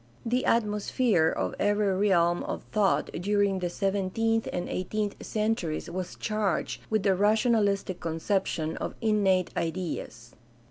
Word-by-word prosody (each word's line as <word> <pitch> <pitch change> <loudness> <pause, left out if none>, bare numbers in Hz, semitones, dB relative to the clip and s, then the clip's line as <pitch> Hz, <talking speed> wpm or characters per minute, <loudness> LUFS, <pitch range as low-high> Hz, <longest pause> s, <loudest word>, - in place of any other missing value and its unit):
The 245 +2 0
atmosphere 210 -4 +2
of - - -2
every 205 -1 +2 0.2
realm 175 -1 +3
of - - -4
thought 210 -3 +2
during 200 +1 +1
the 180 -1 -2
seventeenth 200 +4 0
and 175 - -3
eighteenth 205 +2 -2
centuries 210 -7 -2
was 185 0 -4
charged 215 -3 -1
with 215 -2 +1
the 195 -2 +3
rationahstic 205 -2 +2
conception 165 -1 -1
of - - -4
"innate 200 -5 +2
ideas." 165 -9 -4
200 Hz, 125 wpm, -28 LUFS, 180-215 Hz, 0.2 s, realm